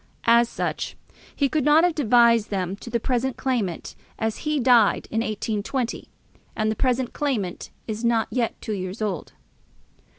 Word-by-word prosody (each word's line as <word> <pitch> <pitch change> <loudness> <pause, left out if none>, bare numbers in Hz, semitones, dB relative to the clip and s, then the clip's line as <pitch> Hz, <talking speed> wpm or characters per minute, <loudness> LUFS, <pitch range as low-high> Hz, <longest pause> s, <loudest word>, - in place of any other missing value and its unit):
As 235 0 +5
such, - - -3 0.4
he 280 - +2
could 300 +1 0
not 300 +3 +5
have 355 -1 +3
devised 235 -5 +4
them 190 -2 -2
to 235 - -10
the 235 0 0
present 250 +2 -1
claimant, 230 -10 -2 0.2
as 220 -1 -2
he 300 -1 +1
died 240 -4 +4
in 225 - 0
1820, 220 +2 -3 0.5
and 215 0 0
the - - -2
present 255 -1 0
claimant 225 -12 -2 0.2
is 220 +1 -4
not 235 -1 +2
yet 240 -3 -1
two 215 - -4
years 185 +1 -5
old. 190 -7 -3
235 Hz, 160 wpm, -24 LUFS, 215-260 Hz, 0.5 s, As